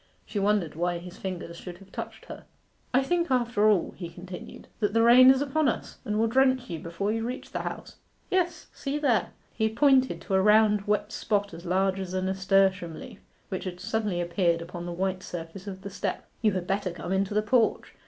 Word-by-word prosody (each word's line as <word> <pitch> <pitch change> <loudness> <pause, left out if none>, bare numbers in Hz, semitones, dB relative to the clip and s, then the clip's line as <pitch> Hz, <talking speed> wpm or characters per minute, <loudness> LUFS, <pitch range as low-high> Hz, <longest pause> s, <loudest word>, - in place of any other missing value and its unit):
She 205 - -3
wondered 200 -5 +1
why 175 +2 -1
his 175 +1 -10
fingers 175 -3 -5
should 175 0 -8
have 195 +1 -17
touched - - -7
her. - - -10 0.5
'I 260 +1 +3
think 345 +3 0
after 235 -4 +2
all,' 200 -5 +2
he 175 -2 -6
continued, 180 +1 -10
'that 205 -2 0
the 230 - +5
rain 250 +2 +8
is 265 +1 +5
upon 290 +1 +1
us, - - -5
and 210 0 -2
will 225 - +3
drench 260 -1 +2
you 165 - -3
before 170 +6 -2
you 225 0 -1
reach 250 +3 -5
the - - -3
House. - - -6 0.3
Yes: 350 -3 0
see 280 +1 -3
there.' 265 -8 +2 0.2
He 220 -1 +1
pointed 260 +2 +3
to 195 - -5
a 190 - +4
round 210 0 +4
wet 210 0 0
spot 205 -3 -1
as 170 +2 -9
large 190 +1 +1
as 185 -1 -4
a 185 - 0
nasturtium 190 -2 +1
leaf, 205 - -10 0.3
which 190 -1 -4
had 180 -1 -5
suddenly 210 -2 -1
appeared 170 -1 +1
upon 175 0 -7
the - - -4
white 185 +1 -2
surface 175 +3 -7
of 190 -1 -7
the 200 - -6
step. 195 - -3 0.2
'You 215 -2 +3
had 185 -2 -2
better 195 0 -1
come 175 +1 -6
into 195 +1 0
the 210 - +3
porch. 225 +1 +1
200 Hz, 210 wpm, -27 LUFS, 180-230 Hz, 0.5 s, rain